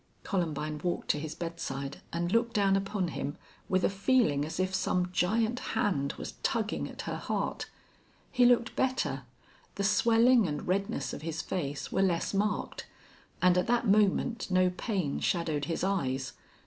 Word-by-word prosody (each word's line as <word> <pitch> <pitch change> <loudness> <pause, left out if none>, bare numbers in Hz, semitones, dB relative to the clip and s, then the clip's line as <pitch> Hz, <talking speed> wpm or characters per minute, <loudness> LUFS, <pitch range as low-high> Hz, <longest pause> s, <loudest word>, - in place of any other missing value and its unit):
Columbine 155 -5 -2
walked 175 -1 -2
to 150 - +2
his 155 +1 -5
bedside 140 -5 -5
and 175 +1 -1
looked 230 +1 +1
down 200 -2 +4
upon 195 -2 -1
him 145 -2 -4 0.3
with 185 -1 +2
a - - +5
feeling 200 - +2
as 160 +4 -5
if 185 0 0
some 180 -1 0
giant 220 +7 +1 0.2
hand 140 -9 +1
was - - -6
tugging 220 -2 -1
at - - -7
her - - -3
heart. - - -3 0.6
He 250 -2 +3
looked 240 -1 +4
better. 150 - 0 0.5
The 200 - -2
swelling 230 +2 +4
and 150 -1 -4
redness 200 +5 -1
of - - -6
his 160 +1 -4
face 145 -6 -3
were - - +1
less 180 -2 +1
marked. 205 +2 -1 0.6
And 180 0 +5
at 180 - -1
that 240 0 +2
moment 210 +3 +2
no 185 -1 +3
pain 185 -6 -2
shadowed 160 -5 0
his 165 +3 -2
eyes. 135 -9 -1
185 Hz, 160 wpm, -30 LUFS, 160-215 Hz, 0.6 s, a